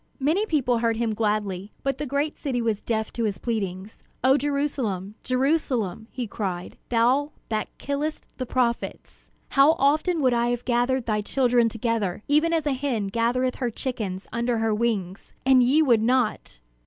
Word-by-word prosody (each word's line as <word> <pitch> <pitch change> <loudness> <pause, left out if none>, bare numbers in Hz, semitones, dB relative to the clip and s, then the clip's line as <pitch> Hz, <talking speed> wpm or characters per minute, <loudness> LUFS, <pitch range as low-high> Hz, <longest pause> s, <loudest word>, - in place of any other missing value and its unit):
Many 325 +10 +1
people 255 - +1
heard 230 -1 +1
him 230 -1 0
gladly, 210 -2 -1
but 275 -1 -1
the 295 - -3
great 285 +3 -1
city 265 -5 -2
was 225 -3 0
deaf 220 -2 -2
to 235 - -2
his 205 -2 -1
pleadings. 200 -3 -4 0.2
"O 260 +1 +6
Jerusalem, 275 -9 -1
Jerusalem," 255 - 0
he 250 -2 -4
cried, 185 -4 -4
"thou 255 +6 +2 0.2
that 215 -1 -1
killest 290 +2 -3
the 255 - -3
prophets, 235 -2 -2 0.2
how 280 +3 +5
often 310 +5 +2
would 255 -2 +4
I 235 0 +2
have 245 0 -2
gathered 245 +1 +1
thy 215 -2 0
children 240 0 +2
together, 220 -4 -2
even 305 +3 +3
as 325 -3 +1
a 290 - +1
hen 255 -7 -1
gathereth 245 +4 0
her 245 - -1
chickens 215 -6 -4
under 235 0 0
her 225 -1 +1
wings, 210 -5 -2
and 260 -1 +6
ye 275 +6 +4
would 235 -6 +4
not!" 240 - 0
240 Hz, 165 wpm, -25 LUFS, 220-275 Hz, 0.2 s, O